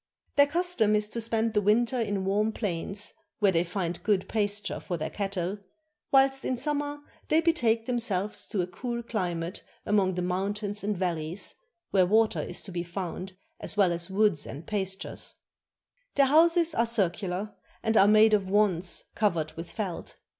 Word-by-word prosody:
Their 285 0 +6
custom 335 - +2
is 210 0 +1
to 230 - -3
spend 225 0 +1
the 210 - +3
winter 235 +4 +2
in 205 -3 -1
warm 210 +3 +1
plains, 200 0 -2 0.2
where 205 -3 +4
they 170 -1 +2
find 175 -1 -3
good 205 -3 +1
pasture 205 -1 -1
for 175 - -4
their 155 0 -4
cattle, 195 -1 -3 0.5
whilst 270 0 +4
in 255 - -1
summer 290 +1 -2 0.3
they 310 - +5
betake 240 -10 +2
themselves 215 -5 -1
to 200 - -1
a - - -1
cool 235 +6 -5
cKmate 180 -5 -3 0.2
among 195 -3 +2
the 180 - -1
mountains 200 +3 -2
and 205 -1 -1
valleys, 170 -1 -3 0.4
where 185 -2 +4
water 220 +3 +3
is - - -5
to 195 - -8
be 175 -1 -2
found 180 +1 -6 0.2
as - - -3
well 195 -4 +4
as 170 +1 0
woods 195 -6 +2
and 145 +4 -8
pastures. 190 -2 -4 0.8
Their 280 - +5
houses 330 +3 +4
are 235 -4 +2
circular, 195 -1 -1 0.3
and 225 - +1
are 200 - +7
made 215 +1 +6
of 195 -3 +2
wands 190 -4 +2
covered 170 -8 0
with 165 +1 -8
felt. 195 -6 -5
205 Hz, 170 wpm, -28 LUFS, 185-225 Hz, 0.8 s, are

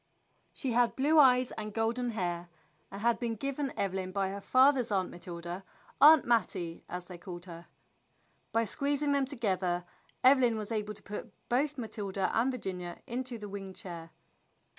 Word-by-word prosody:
She 265 - -3
had 240 0 +3
blue 300 +4 +4
eyes 255 -3 +6
and 215 -1 -6
golden 235 +2 0
hair, 175 -5 -3 0.4
and 195 - -8
had 235 +1 +2
been 235 -2 -2
given 275 +3 -2
Eve 195 -2 0
lyn 185 -1 -3
by 195 0 0
her 200 0 -6
father's 255 0 +4
Aunt 190 -2 0
Matilda, 175 +1 -7 0.4
"Aunt 305 0 +9
Mattie," 180 -8 0
as 180 0 -5
they 180 -1 -9
all - - -23
called 175 -1 -8
her. 170 -1 -10 0.8
By 230 0 +2
squeezing 285 +3 0
them 280 -1 +2
together 185 -9 -1 0.4
Evelyn 255 -3 +5
was 215 +1 -5
able 210 -1 -2
to - - -14
put 205 - -7 0.2
both 280 +4 +1
Matilda 205 -5 -2
and 240 +4 +3
Virginia 180 -8 -5
into 245 0 -4
the 210 -1 -7
wing 195 -1 -7
chair. 170 -3 -7
215 Hz, 170 wpm, -31 LUFS, 185-255 Hz, 0.8 s, Aunt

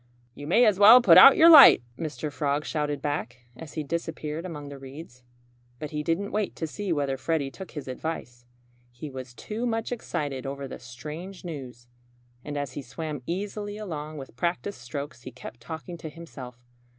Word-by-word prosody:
"You 145 +2 -9
may 225 +9 +5
as 205 -3 +3
well 220 +5 +10
put 245 - +8
out 275 - +10
your 335 +1 +8
light!" 280 - +10
Mr. 155 +1 -5
Frog 145 0 -1
shouted 150 -3 -2
back, 135 -4 -3
as 150 +4 -10
he 155 - -3
disappeared 165 +1 -4
among 145 -4 -8
the 140 -1 -9
reeds. 135 -1 -11 0.6
But 150 +3 -7
he 150 -1 -2
didn't 165 +6 -1
wait 210 -2 -2
to 160 - -3
see 195 +4 -5
whether 140 -4 0
Freddie 145 -2 -1
took 190 +3 -10
his 145 - -6
advice. 125 -3 -6 0.4
He 130 +5 -9
was 130 -2 -9
too 225 - -4
much 225 0 -2
excited 145 - -4
over 140 0 -5
the - - -9
strange 155 +11 -9
news. 130 -7 -8 0.6
And 145 -1 -5
as 140 -3 -4
he 145 - -5
swam 145 +2 -6
easily 205 +3 -4
along 155 -7 -6
with 135 -4 -10
practiced 170 +3 -3
strokes 140 +1 -7
he 130 - -9
kept 120 -1 -11
talking 160 +6 -8
to 160 - -7
himself. 130 -7 -11
150 Hz, 185 wpm, -26 LUFS, 135-175 Hz, 0.6 s, well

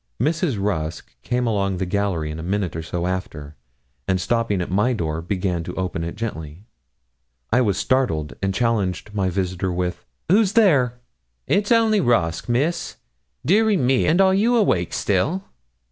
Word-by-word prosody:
Mrs. 155 - 0
Rusk 85 -6 -3
came 125 +1 -1
along 100 -4 0
the 95 - -1
gallery 90 -5 -1
in 80 - -6
a - - -5
minute 95 +1 -2
or 80 - -3
so 85 +2 -3
after, 80 -5 -4 0.5
and 95 -1 +1
stopping 115 0 0
at 90 - -3
my 105 +7 +2
door, 80 -6 -2
began 90 -1 -2
to - - -6
open 90 -3 -3
it 85 - -5
gently. 85 -5 -6 0.9
I 125 - +5
was 100 -6 +1
startled, 80 - 0
and 95 0 0
challenged 105 -2 -1
my 100 -3 0
visitor 95 0 -2
with 90 0 -3 0.2
'Who's 200 +3 +3
there?' 135 - +3 0.5
'It's 205 +3 +1
only 225 -3 +4
Rusk, 85 - +1
Miss. 150 +9 0 0.5
Dearie 210 +3 +4
me! 130 -2 +2
and 165 +4 +3
are 190 -1 +5
you 225 +5 +3
awake 95 - +2
still?' 140 - 0
100 Hz, 160 wpm, -22 LUFS, 90-135 Hz, 0.9 s, I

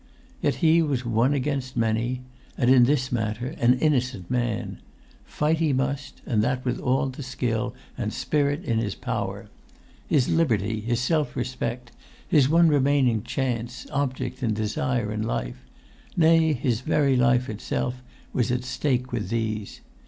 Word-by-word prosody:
Yet - - +1
he 165 +1 +6
was 140 -6 -1
one 120 +4 +2
against 135 -1 -2
many; 115 +3 0 0.3
and, 125 -1 +3
in 125 -2 +7
this 130 -1 +1
matter, 115 +1 -2
an 120 +1 +5
innocent 125 - 0
man. 120 -3 -1 0.5
Fight 155 +2 0
he 155 -4 +2
must, 135 +1 -2
and 110 -3 +1
that 125 +2 -1
with 125 0 -1
all 130 +1 +1
the 130 +2 -8
skill 125 -4 -2 0.2
and - - -1
spirit 145 +1 0
in 115 -1 +1
his 105 -4 -2
power. - - -4 0.6
His 135 -5 +2
liberty, 110 -9 +1
his 120 +2 -1
self 150 0 0
respect; 125 -1 -3 0.4
his 140 -3 +4
one 165 +2 +5
remaining 135 -6 +3
chance, 120 0 -3
object, 135 -1 -2
and 110 -4 0
desire 115 0 -1
in 105 0 -2
life; - - -3 0.5
nay, 160 -1 +5
his 120 -3 -1
very 140 0 +2
life 125 0 +3
itself 125 +3 -3 0.3
was 120 -1 +1
at 125 0 -1
stake 130 -1 -1
with 110 -6 -3
these. 110 -2 -3
125 Hz, 150 wpm, -25 LUFS, 115-140 Hz, 0.6 s, in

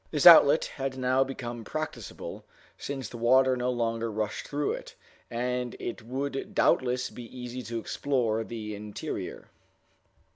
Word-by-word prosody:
This 150 -3 0
outlet 160 -3 +9
had 135 -1 -4
now 130 +1 +3
become 120 -3 -6
practicable, 125 -6 -6 0.3
since 135 -4 -5
the 120 - -9
water 130 +2 +5
no 125 0 -1
longer 115 -2 -1
rushed 105 0 -3
through 145 0 -1
it, - - -6 0.3
and 125 +1 -2
it 120 - -5
would 135 +4 -4
doubtless 125 0 +2
be 120 - -8
easy 125 +1 -7
to 115 -1 -5
explore 115 -2 0
the 110 -2 -6
interior. 105 0 -6
125 Hz, 140 wpm, -28 LUFS, 115-135 Hz, 0.3 s, outlet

